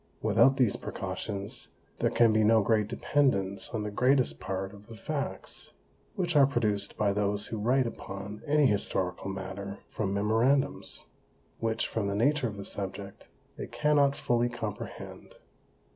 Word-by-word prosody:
Without 135 Hz, +1 st, +5 dB
these 125 Hz, -6 st, +3 dB
Precautions, 100 Hz, -1 st, -5 dB, 0.3 s
there -, -, +2 dB
can 115 Hz, -2 st, +4 dB
be 110 Hz, 0 st, +4 dB
no 110 Hz, 0 st, +5 dB
great 105 Hz, 0 st, +2 dB
Dependance 110 Hz, -5 st, +1 dB
on 110 Hz, -2 st, -3 dB
the 105 Hz, -, -4 dB
greatest 130 Hz, +4 st, +2 dB
Part 95 Hz, +1 st, -4 dB
of 100 Hz, 0 st, -14 dB
the 115 Hz, -, -10 dB
Facts, 140 Hz, +4 st, -5 dB, 0.4 s
which 175 Hz, -3 st, -1 dB
are 140 Hz, -2 st, +7 dB
produced 105 Hz, -6 st, -1 dB
by 100 Hz, -2 st, +2 dB
those 105 Hz, 0 st, 0 dB
who 110 Hz, -, -4 dB
write 125 Hz, +5 st, +2 dB
upon 100 Hz, -2 st, -6 dB
any 150 Hz, 0 st, +4 dB
Historical 95 Hz, -4 st, 0 dB
Matter 95 Hz, +1 st, -5 dB
from 100 Hz, -3 st, -2 dB
Memorandums; 110 Hz, -, +1 dB, 0.5 s
which, 115 Hz, 0 st, 0 dB
from 110 Hz, -3 st, -2 dB
the 100 Hz, -, -1 dB
Nature 140 Hz, +4 st, +2 dB
of 105 Hz, -2 st, -6 dB
the 100 Hz, -, -6 dB
Subject, 100 Hz, 0 st, -4 dB, 0.3 s
they -, -, -5 dB
cannot 145 Hz, -2 st, +2 dB
fully 120 Hz, 0 st, +1 dB
comprehend. 110 Hz, -4 st, -7 dB
110 Hz, 150 wpm, -29 LUFS, 100-130 Hz, 0.5 s, are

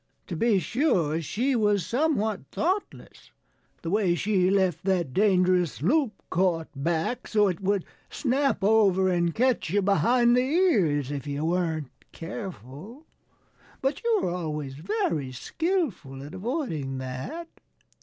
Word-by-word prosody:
To 175 Hz, -, -5 dB
be 220 Hz, +4 st, +2 dB
sure, 180 Hz, -, +1 dB
she 250 Hz, -, -1 dB
was 210 Hz, -5 st, +2 dB
somewhat 235 Hz, -7 st, 0 dB
thoughtless 375 Hz, +5 st, -3 dB, 0.5 s
the 165 Hz, -, -3 dB
way 195 Hz, -4 st, +2 dB
she 185 Hz, +1 st, +1 dB
left 190 Hz, -3 st, +1 dB
that 175 Hz, -8 st, 0 dB
dangerous 185 Hz, -6 st, +2 dB
loop 260 Hz, -, +1 dB
caught 170 Hz, -2 st, +1 dB
back, 165 Hz, -, -2 dB
so 210 Hz, -2 st, +3 dB
it 185 Hz, 0 st, -2 dB
would 195 Hz, -1 st, 0 dB, 0.2 s
snap 270 Hz, -4 st, 0 dB
over 195 Hz, -3 st, +4 dB
and 175 Hz, -2 st, +1 dB
catch 250 Hz, -8 st, +1 dB
you 200 Hz, +3 st, +1 dB
behind 240 Hz, +5 st, +3 dB
the 250 Hz, -, +4 dB
ears 215 Hz, -, +2 dB
if 145 Hz, 0 st, -5 dB
you 145 Hz, +2 st, -2 dB
weren't 165 Hz, -4 st, -1 dB, 0.2 s
careful. 185 Hz, -, -8 dB, 0.7 s
But 270 Hz, +1 st, -2 dB
you 455 Hz, -4 st, +2 dB
were -, -, 0 dB
always 150 Hz, -6 st, -4 dB
very 155 Hz, -4 st, -2 dB
skillful 190 Hz, -, -2 dB
at 145 Hz, -, -10 dB
avoiding 185 Hz, -, -3 dB
that." 130 Hz, -, -6 dB
190 Hz, 135 wpm, -26 LUFS, 160-240 Hz, 0.7 s, over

